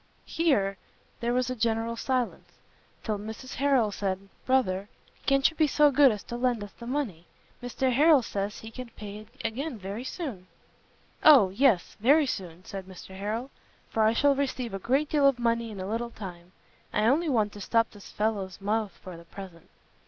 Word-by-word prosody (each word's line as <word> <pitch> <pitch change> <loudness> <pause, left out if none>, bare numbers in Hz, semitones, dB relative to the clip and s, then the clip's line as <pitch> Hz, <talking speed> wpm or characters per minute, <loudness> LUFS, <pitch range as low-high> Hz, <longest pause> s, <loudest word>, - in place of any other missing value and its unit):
Here 200 - +1 0.4
there 235 0 0
was 250 0 +1
a - - -2
general 230 0 0
silence; 250 0 -2 0.6
till 215 -3 -2
Mrs 220 +5 -7
Harrel 265 -6 +2
said 195 -1 -3 0.2
"Brother, 205 -7 +1 0.4
can't 275 0 +5
you 320 - -5
be 310 -1 +3
so 295 +1 +4
good 275 -1 +6
as 210 -2 -5
to 240 - -6
lend 240 -3 0
us 205 - -9
the 235 - -11
money? 230 - -3 0.3
Mr 250 +1 -1
Harrel 295 0 +6
says 200 -1 -3
he 225 - -9
can 255 0 -8
pay 205 -1 -7
it 215 - -13 0.2
again 255 +4 -3
very 200 +4 -6
soon." 260 - -6 0.8
"O 270 -11 +8
yes, 220 -4 +2
very 285 +8 +5
soon," 185 -7 -5
said 195 -1 -6
Mr 190 0 -11
Harrel, 220 +7 -3 0.4
"for 220 - +1
I 220 +1 +4
shall 285 +4 +4
receive 260 -5 -2
a 195 - -3
great 270 +9 +1
deal 290 -2 +4
of 275 -3 +3
money 230 -1 0
in 205 -3 -8
a 185 - -4
little 230 +4 -2
time; 180 -6 -9 0.4
I 210 - +1
only 300 +8 +3
want 215 -6 +1
to 205 - -9
stop 230 +3 +2
this 205 -2 -13
fellow's 205 -3 -2
mouth 210 0 -1
for 185 -2 -8
the 170 0 -13
present." 180 -2 -11
225 Hz, 190 wpm, -28 LUFS, 200-260 Hz, 0.8 s, O